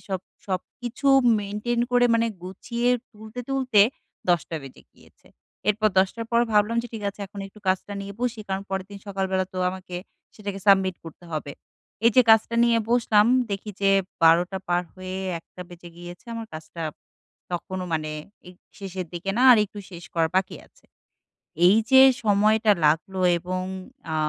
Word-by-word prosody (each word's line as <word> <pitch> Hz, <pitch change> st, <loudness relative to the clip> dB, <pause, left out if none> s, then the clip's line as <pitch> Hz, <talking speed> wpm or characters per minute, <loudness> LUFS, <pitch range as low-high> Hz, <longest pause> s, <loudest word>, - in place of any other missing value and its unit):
সব 190 Hz, -2 st, -2 dB, 0.3 s
সবকিছু 240 Hz, +8 st, -3 dB, 0.3 s
মেইনটেইন 210 Hz, +4 st, -2 dB
করে 245 Hz, 0 st, +5 dB
মানে 230 Hz, 0 st, +2 dB, 0.2 s
গুছিয়ে 235 Hz, +6 st, -3 dB, 0.2 s
তুলতে, 220 Hz, +2 st, -9 dB
তুলতে 260 Hz, -6 st, +2 dB, 0.5 s
১০ 175 Hz, -2 st, +4 dB
টা 165 Hz, -, -2 dB
বেজে 135 Hz, -1 st, -12 dB
গিয়েছে। -, -, -24 dB, 0.4 s
এরপর 215 Hz, +1 st, +3 dB
১০ 190 Hz, -, +4 dB
টার 230 Hz, -1 st, -5 dB
পর 235 Hz, -, +4 dB
ভাবলাম 210 Hz, +2 st, +3 dB
যে 240 Hz, -, -8 dB
ঠিক 220 Hz, -, -6 dB
আছে, 205 Hz, -, -17 dB
এখন 200 Hz, +1 st, -9 dB
একটু 195 Hz, +2 st, -16 dB
কাজটা 190 Hz, +2 st, 0 dB
নিয়ে 200 Hz, 0 st, -7 dB
বসি। 245 Hz, -2 st, -2 dB
কারণ 190 Hz, 0 st, -2 dB
পরেরদিন 190 Hz, +1 st, -5 dB
সকালবেলা 190 Hz, -1 st, -1 dB
তো 185 Hz, -, -5 dB
আমাকে 185 Hz, -1 st, -8 dB, 0.4 s
সেটাকে 200 Hz, -2 st, -6 dB
সাবমিট 190 Hz, -2 st, +4 dB
করতে 165 Hz, +2 st, -12 dB
হবে। 145 Hz, -2 st, -4 dB, 0.5 s
এই 230 Hz, -, +7 dB
যে 255 Hz, -, +9 dB
কাজটা 220 Hz, +1 st, +4 dB
নিয়ে 235 Hz, -1 st, +3 dB
বসলাম। 225 Hz, -3 st, +4 dB, 0.2 s
দেখি 200 Hz, +2 st, -4 dB
যে 195 Hz, -1 st, +3 dB, 0.3 s
১২ 170 Hz, +3 st, +5 dB
টা 190 Hz, -, -2 dB
পার 175 Hz, 0 st, +2 dB
হয়ে 185 Hz, 0 st, -6 dB, 0.2 s
১ -, -, -19 dB
টা 180 Hz, -, -7 dB
বেজে 175 Hz, -1 st, -12 dB
গিয়েছে, 175 Hz, +4 st, -11 dB
আমার 230 Hz, -1 st, -5 dB
কাজটা 160 Hz, +1 st, -8 dB, 0.7 s
তখনও 185 Hz, +1 st, -4 dB
মানে 155 Hz, -1 st, -1 dB, 0.4 s
এ -, -, -10 dB, 0.3 s
শেষের 190 Hz, -2 st, -5 dB
দিকে 175 Hz, +3 st, -3 dB
না -, -, +3 dB
আর 235 Hz, -, +5 dB
একটু 205 Hz, 0 st, -11 dB
শেষ 175 Hz, -1 st, -10 dB
করা 165 Hz, -1 st, +2 dB
বাকি 190 Hz, 0 st, 0 dB
আছে। -, -, -28 dB, 0.8 s
এই 190 Hz, +4 st, +6 dB
যে 265 Hz, 0 st, +9 dB, 0.2 s
সময়টা 215 Hz, +1 st, +3 dB
লাগলো 170 Hz, +5 st, +1 dB, 0.2 s
এবং 180 Hz, +2 st, -4 dB, 0.5 s
আ -, -, -1 dB
195 Hz, 170 wpm, -24 LUFS, 180-220 Hz, 0.8 s, যে